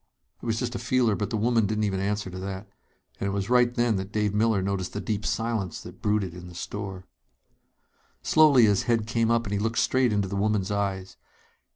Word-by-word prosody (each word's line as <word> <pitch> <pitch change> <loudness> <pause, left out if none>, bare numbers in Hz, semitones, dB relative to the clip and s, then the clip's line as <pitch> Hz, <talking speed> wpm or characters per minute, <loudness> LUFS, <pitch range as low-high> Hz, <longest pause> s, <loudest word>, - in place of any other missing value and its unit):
It - - -7
was 110 -1 0
just 120 0 -2
a 120 - -4
feeler, 120 -2 +2
but 100 +1 -2
the 110 - -1
woman 115 -1 +2
didn't 110 +1 -1
even 95 -2 0
answer 100 -1 -2
to 95 - -7
that. 95 +1 -6 0.5
And 100 - -1
it - - -1
was 100 +3 -3
right 125 -1 +5
then 120 -3 +1
that 95 +1 -5
Dave 105 -2 0
Miller 105 -2 +2
noticed 95 -1 -2
the 105 - -3
deep 105 0 -3
silence 115 -5 -2
that - - -12
brooded 105 -4 0
in 90 0 -10
the 90 - -12
store. 95 0 -6 1.2
Slowly 145 -6 +6
his 100 -2 +3
head 115 -2 +2
came 115 0 0
up 115 0 +2
and 100 - -4
he 100 - 0
looked 115 +2 -1
straight 130 -2 +2
into 100 -2 0
the 100 - -4
woman's 105 -1 0
eyes. 95 -2 -2
105 Hz, 220 wpm, -26 LUFS, 100-115 Hz, 1.2 s, Slowly